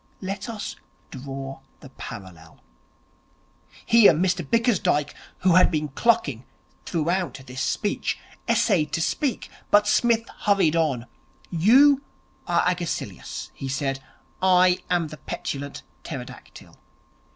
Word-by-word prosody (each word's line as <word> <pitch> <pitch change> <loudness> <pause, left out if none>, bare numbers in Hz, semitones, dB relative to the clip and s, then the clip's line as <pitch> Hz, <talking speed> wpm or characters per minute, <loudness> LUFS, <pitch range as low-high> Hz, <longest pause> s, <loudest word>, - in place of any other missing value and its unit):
Let 195 +4 -5
us 215 -3 -5 0.3
draw 135 0 -7 0.2
the 135 - -12
parallel.' 95 -10 -10 1.3
Here 230 -5 +7
Mr 180 +2 0
Bickersdyke, 210 - +1 0.3
who 185 -1 +4
had 185 +1 +6
been 150 -3 -2
clucking 140 - +1 0.4
throughout 175 -1 -1
this 130 0 -6
speech, 205 +8 -1 0.3
essayed 155 - +2
to - - +1
speak; 270 - -1 0.2
but 205 0 +5
Psmith 230 +1 +2 0.2
hurried 195 -6 +3
on. 145 -8 0 0.5
'You 260 - +5 0.5
are 170 -1 +2
Agesilaus,' 180 -2 -4
he 135 - -6
said. 135 0 -2 0.4
'I 185 -1 +4
am 175 -3 +1
the 155 - -9
Petulant 140 -1 -5 0.2
Pterodactyl. - - -10
175 Hz, 110 wpm, -24 LUFS, 140-205 Hz, 1.3 s, Here